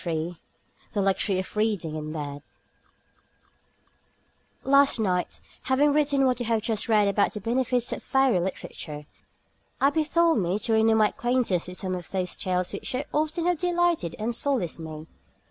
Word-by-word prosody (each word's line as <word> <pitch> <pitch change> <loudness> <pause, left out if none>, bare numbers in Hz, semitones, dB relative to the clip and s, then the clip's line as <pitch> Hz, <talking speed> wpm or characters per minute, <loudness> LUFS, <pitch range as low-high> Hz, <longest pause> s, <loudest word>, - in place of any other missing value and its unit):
III 170 0 -3 0.6
THE 205 - 0
LUXURY 195 0 +1
OF 185 +2 -5
READING 210 -8 0
IN 155 0 -5
BED 145 -2 -5 2.2
Last 275 +1 +4
night, 180 -4 -1 0.3
having 285 +2 +3
written 285 -2 +2
what 255 -1 +1
you 240 - -3
have 225 -2 +1
just 225 0 -1
read 210 -2 +4
about 200 0 +1
the 210 - -5
benefits 245 +2 0
of - - -6
fairy 265 -7 +2
literature, 155 -4 -5 0.7
I 275 +1 +4
bethought 325 -1 +2
me 180 +1 0
to 225 +1 0
renew 220 0 +4
my 215 -1 +4
acquaintance 240 -8 0
with 180 0 -6
some 185 -2 -3
of 180 -2 -6
those 185 -2 -2
tales 180 -1 -1
which - - -5
so 260 +2 -2
often 310 +3 0
have 355 -3 +1
delighted 345 - +1
and 225 +3 -2
solaced 235 - -1
me. 155 -1 -7
220 Hz, 165 wpm, -26 LUFS, 180-270 Hz, 2.2 s, Last